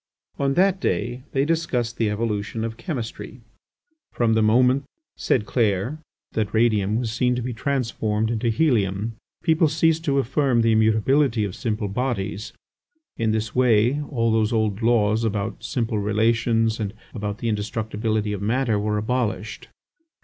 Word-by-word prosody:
On 140 Hz, 0 st, +1 dB
that 190 Hz, 0 st, +3 dB
day 120 Hz, -6 st, -1 dB
they 135 Hz, 0 st, +1 dB
discussed 135 Hz, -8 st, -1 dB
the 110 Hz, -2 st, +1 dB
evolution 105 Hz, 0 st, -2 dB
of 115 Hz, -1 st, -4 dB
chemistry. 120 Hz, -1 st, -6 dB, 0.7 s
"From 115 Hz, -2 st, +1 dB
the 110 Hz, -, +3 dB
moment," 125 Hz, +5 st, +3 dB, 0.3 s
said 110 Hz, -5 st, 0 dB
Clair, 110 Hz, +5 st, 0 dB, 0.3 s
"that 110 Hz, -1 st, -2 dB
radium 110 Hz, -3 st, +2 dB
was 115 Hz, -1 st, -1 dB
seen 125 Hz, +1 st, +1 dB
to 125 Hz, -, -2 dB
be 125 Hz, 0 st, -3 dB
transformed 110 Hz, -4 st, -1 dB
into 115 Hz, +1 st, 0 dB
helium, 110 Hz, -5 st, +1 dB, 0.3 s
people 160 Hz, -1 st, +3 dB
ceased 160 Hz, +1 st, +2 dB
to 140 Hz, -2 st, +1 dB
affirm 135 Hz, -2 st, +2 dB
the 115 Hz, -, +3 dB
immutability 110 Hz, +3 st, +3 dB
of 100 Hz, -3 st, -3 dB
simple 110 Hz, -4 st, -2 dB
bodies; 105 Hz, -2 st, -3 dB, 0.7 s
in 115 Hz, -1 st, 0 dB
this 110 Hz, -1 st, -1 dB
way 125 Hz, +2 st, +3 dB
all 115 Hz, -4 st, +1 dB
those 110 Hz, 0 st, +2 dB
old 110 Hz, -2 st, 0 dB
laws 110 Hz, -1 st, +2 dB
about 110 Hz, +1 st, -2 dB
simple 115 Hz, 0 st, -1 dB
relations 115 Hz, +2 st, +1 dB
and 105 Hz, 0 st, -3 dB, 0.2 s
about 105 Hz, -2 st, -4 dB
the 120 Hz, -, -4 dB
indestructibility 110 Hz, 0 st, -1 dB
of 100 Hz, -, -4 dB
matter 115 Hz, 0 st, +1 dB
were 105 Hz, +1 st, -1 dB
abolished." 110 Hz, -1 st, -2 dB
115 Hz, 150 wpm, -23 LUFS, 105-125 Hz, 0.7 s, that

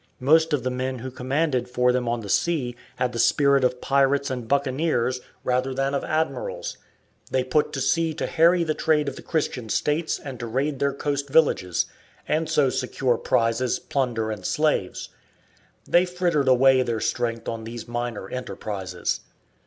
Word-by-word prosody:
Most 160 Hz, +5 st, +4 dB
of 145 Hz, -5 st, +1 dB
the 130 Hz, -, -1 dB
men 130 Hz, +1 st, -2 dB
who 130 Hz, +2 st, -6 dB
commanded 130 Hz, +1 st, -1 dB
for 125 Hz, 0 st, +2 dB
them 125 Hz, -1 st, 0 dB
on 120 Hz, 0 st, -1 dB
the 105 Hz, -, -8 dB
sea 130 Hz, -, 0 dB, 0.2 s
had 125 Hz, -1 st, -1 dB
the 115 Hz, -, -3 dB
spirit 140 Hz, +1 st, +4 dB
of 125 Hz, 0 st, +1 dB
pirates 140 Hz, 0 st, +2 dB
and 125 Hz, -3 st, -4 dB
buccaneers 130 Hz, -2 st, 0 dB, 0.2 s
rather 130 Hz, +1 st, 0 dB
than 135 Hz, +1 st, 0 dB
of 140 Hz, -, -1 dB
admirals. -, -, -2 dB, 0.5 s
They 130 Hz, -1 st, +1 dB
put 140 Hz, +4 st, +1 dB
to 135 Hz, -, -2 dB
sea 165 Hz, +3 st, +1 dB
to -, -, -2 dB
harry 170 Hz, +1 st, +4 dB
the 155 Hz, -2 st, 0 dB
trade 150 Hz, -1 st, +1 dB
of 140 Hz, -, -3 dB
the -, -, -9 dB
Christian 130 Hz, -7 st, -2 dB
states 150 Hz, +8 st, 0 dB
and 135 Hz, -3 st, -8 dB
to 120 Hz, -, -4 dB
raid 135 Hz, +4 st, -1 dB
their 140 Hz, 0 st, +2 dB
coast 140 Hz, 0 st, -2 dB
villages, 115 Hz, -, +2 dB, 0.4 s
and 160 Hz, +1 st, 0 dB
so 140 Hz, -3 st, +3 dB
secure 125 Hz, -1 st, 0 dB
prizes, 115 Hz, +2 st, +1 dB
plunder, 120 Hz, -5 st, -1 dB
and 105 Hz, -3 st, -6 dB
slaves. 150 Hz, -7 st, 0 dB, 0.8 s
They 175 Hz, +1 st, +4 dB
frittered 175 Hz, -6 st, 0 dB
away 130 Hz, 0 st, +5 dB
their 115 Hz, -3 st, -1 dB
strength 115 Hz, 0 st, -2 dB
on 115 Hz, -1 st, -4 dB
these 115 Hz, +1 st, -7 dB
minor 120 Hz, -4 st, -4 dB
enterprises. 100 Hz, -7 st, -4 dB
130 Hz, 170 wpm, -24 LUFS, 120-150 Hz, 0.8 s, away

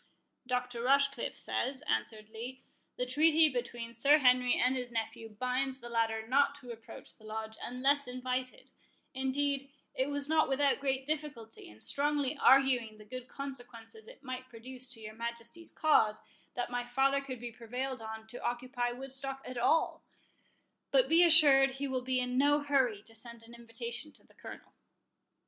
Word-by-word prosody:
"Dr. 250 Hz, -1 st, -2 dB
Rochecliffe 275 Hz, +2 st, +2 dB
says," 265 Hz, 0 st, -1 dB
answered 215 Hz, -, -1 dB
Lee, 245 Hz, +4 st, -8 dB, 0.3 s
"the 250 Hz, -, -1 dB
treaty 310 Hz, +4 st, +4 dB
between 240 Hz, -2 st, -4 dB
Sir 280 Hz, +6 st, +5 dB
Henry 250 Hz, -3 st, +4 dB
and 255 Hz, +1 st, +3 dB
his 250 Hz, -1 st, -4 dB
nephew 225 Hz, 0 st, -4 dB
binds 255 Hz, +4 st, -1 dB
the 240 Hz, -2 st, -10 dB
latter 225 Hz, -1 st, 0 dB
not 280 Hz, +3 st, +3 dB
to 255 Hz, -4 st, -8 dB
approach 230 Hz, -1 st, -10 dB
the 220 Hz, -, -22 dB
Lodge, 220 Hz, 0 st, -5 dB
unless 270 Hz, +3 st, +1 dB
invited;—indeed, 260 Hz, +2 st, -3 dB, 0.2 s
it 260 Hz, +2 st, 0 dB
was 285 Hz, 0 st, -2 dB
not 315 Hz, -2 st, +3 dB
without 275 Hz, +1 st, +2 dB
great 270 Hz, -1 st, -1 dB
difficulty, 285 Hz, -7 st, -5 dB
and 105 Hz, +1 st, -8 dB
strongly 290 Hz, 0 st, 0 dB
arguing 260 Hz, -6 st, +4 dB
the 215 Hz, -, -14 dB
good 255 Hz, +3 st, -8 dB
consequences 270 Hz, -, -8 dB
it -, -, -14 dB
might 255 Hz, -1 st, -6 dB
produce 250 Hz, +2 st, -9 dB
to 250 Hz, -3 st, -7 dB
your 215 Hz, 0 st, -8 dB
Majesty's 235 Hz, +7 st, -6 dB
cause, 220 Hz, -9 st, +3 dB, 0.4 s
that 245 Hz, 0 st, -3 dB
my 245 Hz, 0 st, -1 dB
father 270 Hz, +3 st, +2 dB
could 260 Hz, -3 st, -7 dB
be 240 Hz, 0 st, -6 dB
prevailed 245 Hz, +2 st, -5 dB
on 220 Hz, 0 st, -7 dB
to 220 Hz, +2 st, -8 dB
occupy 245 Hz, 0 st, -2 dB
Woodstock 270 Hz, +1 st, -6 dB
at 255 Hz, -1 st, -5 dB
all; 315 Hz, +7 st, +2 dB, 0.9 s
but -, -, +4 dB
be 330 Hz, +2 st, +6 dB
assured 285 Hz, -5 st, +7 dB
he 275 Hz, +1 st, -3 dB
will 260 Hz, -1 st, -1 dB
be 255 Hz, 0 st, 0 dB
in 250 Hz, 0 st, 0 dB
no 290 Hz, +1 st, +4 dB
hurry 260 Hz, -8 st, +1 dB
to 225 Hz, -, -9 dB
send 235 Hz, +1 st, -10 dB
an 230 Hz, +1 st, -14 dB
invitation 235 Hz, +4 st, -6 dB
to -, -, -23 dB
the -, -, -24 dB
Colonel." -, -, -11 dB
255 Hz, 165 wpm, -32 LUFS, 235-275 Hz, 0.9 s, assured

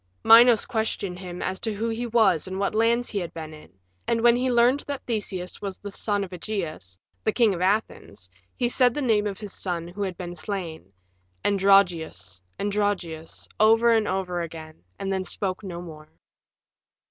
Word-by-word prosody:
Minos 230 Hz, -1 st, +7 dB
questioned 220 Hz, -6 st, -2 dB
him 180 Hz, -1 st, -6 dB
as 190 Hz, 0 st, -3 dB
to 220 Hz, -2 st, -3 dB
who 225 Hz, +3 st, -2 dB
he 230 Hz, +2 st, -3 dB
was 210 Hz, -8 st, +3 dB
and 190 Hz, 0 st, -5 dB
what 200 Hz, +1 st, -1 dB
lands 230 Hz, +2 st, +2 dB
he 205 Hz, -, -2 dB
had 175 Hz, -3 st, -5 dB
been 155 Hz, -1 st, -7 dB
in, 155 Hz, -, -14 dB, 0.4 s
and 230 Hz, -1 st, +1 dB
when 240 Hz, 0 st, +6 dB
he 255 Hz, +1 st, 0 dB
learned 245 Hz, +3 st, +4 dB
that 285 Hz, -2 st, -5 dB
Theseus 195 Hz, -6 st, -4 dB
was 195 Hz, -2 st, -5 dB
the 205 Hz, -, -8 dB
son 205 Hz, 0 st, -1 dB
of 190 Hz, -, -8 dB
Ægeus, 170 Hz, -, -5 dB, 0.3 s
the 215 Hz, -, +2 dB
King 225 Hz, -3 st, +3 dB
of 175 Hz, -, -5 dB
Athens, 185 Hz, -, -1 dB, 0.3 s
he 245 Hz, -, +1 dB
said 245 Hz, 0 st, +3 dB
the 295 Hz, -, -1 dB
name 215 Hz, -4 st, +2 dB
of 200 Hz, -2 st, -5 dB
his 210 Hz, -3 st, -7 dB
son 170 Hz, -3 st, -3 dB
who 180 Hz, +4 st, -8 dB
had 190 Hz, -3 st, -3 dB
been 175 Hz, -1 st, -6 dB
slain, 170 Hz, -, -6 dB, 0.5 s
"Androgeus, 175 Hz, -, +2 dB, 0.2 s
Androgeus," 200 Hz, -6 st, -2 dB
over 225 Hz, +2 st, +5 dB
and 220 Hz, -2 st, +2 dB
over 180 Hz, -2 st, -2 dB
again, 160 Hz, -, -9 dB
and 195 Hz, 0 st, -2 dB
then 190 Hz, -1 st, -1 dB
spoke 190 Hz, +1 st, -2 dB
no 175 Hz, -3 st, -6 dB
more. 155 Hz, -3 st, -11 dB
195 Hz, 180 wpm, -25 LUFS, 175-220 Hz, 0.5 s, Minos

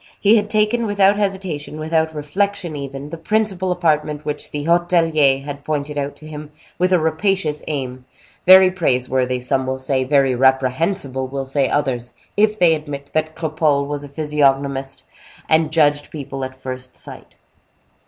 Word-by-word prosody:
He 210 Hz, +2 st, +5 dB
had 210 Hz, -1 st, +1 dB
taken, 215 Hz, +2 st, +1 dB
without 200 Hz, -1 st, +4 dB
hesitation, 190 Hz, -7 st, -3 dB
without 160 Hz, 0 st, 0 dB
reflection 180 Hz, +3 st, -2 dB
even, 140 Hz, +1 st, -7 dB
the 165 Hz, -, -7 dB
principal 195 Hz, -2 st, 0 dB
apartment 150 Hz, -4 st, 0 dB
which 150 Hz, -1 st, -4 dB
the 145 Hz, -1 st, -4 dB
hotelier 165 Hz, -5 st, +3 dB
had 145 Hz, 0 st, -7 dB
pointed 150 Hz, -1 st, -3 dB
out 145 Hz, 0 st, -3 dB
to 155 Hz, -, -13 dB
him 150 Hz, -1 st, -8 dB, 0.3 s
with 180 Hz, +1 st, +2 dB
a 180 Hz, -, +5 dB
rapacious 160 Hz, -1 st, 0 dB
aim, 130 Hz, -4 st, -4 dB, 0.4 s
very 185 Hz, 0 st, +8 dB
praiseworthy, 130 Hz, -6 st, 0 dB
some 130 Hz, +1 st, -1 dB
will 130 Hz, 0 st, -1 dB
say, 130 Hz, 0 st, 0 dB
very 135 Hz, -1 st, +2 dB
reprehensible 130 Hz, +2 st, +1 dB
will 135 Hz, +1 st, -4 dB
say 135 Hz, 0 st, 0 dB
others, 125 Hz, -4 st, -1 dB, 0.2 s
if 215 Hz, +1 st, +2 dB
they 175 Hz, -5 st, +5 dB
admit 145 Hz, -2 st, -6 dB
that 155 Hz, 0 st, -1 dB
Cropole 155 Hz, -3 st, 0 dB
was 145 Hz, 0 st, -4 dB
a 145 Hz, -, -9 dB
physiognomist, 140 Hz, -2 st, 0 dB, 0.4 s
and 160 Hz, -1 st, +3 dB
judged 145 Hz, -2 st, +2 dB
people 135 Hz, -3 st, -6 dB
at 130 Hz, 0 st, -5 dB
first 130 Hz, -1 st, -8 dB
sight. -, -, -9 dB
150 Hz, 155 wpm, -20 LUFS, 135-175 Hz, 0.4 s, very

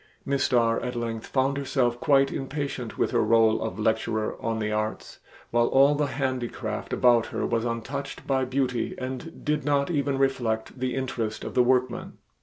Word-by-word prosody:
Miss 140 Hz, 0 st, +1 dB
Starr 115 Hz, -2 st, +2 dB
at 125 Hz, 0 st, -4 dB
length 115 Hz, -1 st, -3 dB
found 135 Hz, +1 st, +1 dB
herself 125 Hz, -3 st, 0 dB
quite 135 Hz, 0 st, +3 dB
impatient 135 Hz, -4 st, -4 dB
with -, -, +1 dB
her -, -, +2 dB
role 115 Hz, -1 st, +4 dB
of 90 Hz, -, -3 dB
lecturer 110 Hz, 0 st, 0 dB
on 115 Hz, -1 st, -1 dB
the 105 Hz, -1 st, -2 dB
arts, 105 Hz, 0 st, -3 dB, 0.3 s
while 120 Hz, 0 st, +3 dB
all 140 Hz, +2 st, +5 dB
the 145 Hz, 0 st, 0 dB
handicraft 130 Hz, -5 st, -3 dB
about 120 Hz, -2 st, +4 dB
her -, -, -2 dB
was 115 Hz, 0 st, 0 dB
untouched 135 Hz, +4 st, -4 dB
by 135 Hz, -1 st, +1 dB
beauty 130 Hz, -2 st, -1 dB
and 130 Hz, +5 st, -6 dB
did 150 Hz, 0 st, 0 dB
not 145 Hz, +2 st, +1 dB
even 140 Hz, -3 st, 0 dB
reflect 125 Hz, -3 st, -1 dB
the 130 Hz, 0 st, -1 dB
interest 120 Hz, -5 st, -3 dB
of -, -, -5 dB
the 125 Hz, -, +4 dB
workman. 125 Hz, -1 st, +1 dB
125 Hz, 175 wpm, -26 LUFS, 115-135 Hz, 0.3 s, all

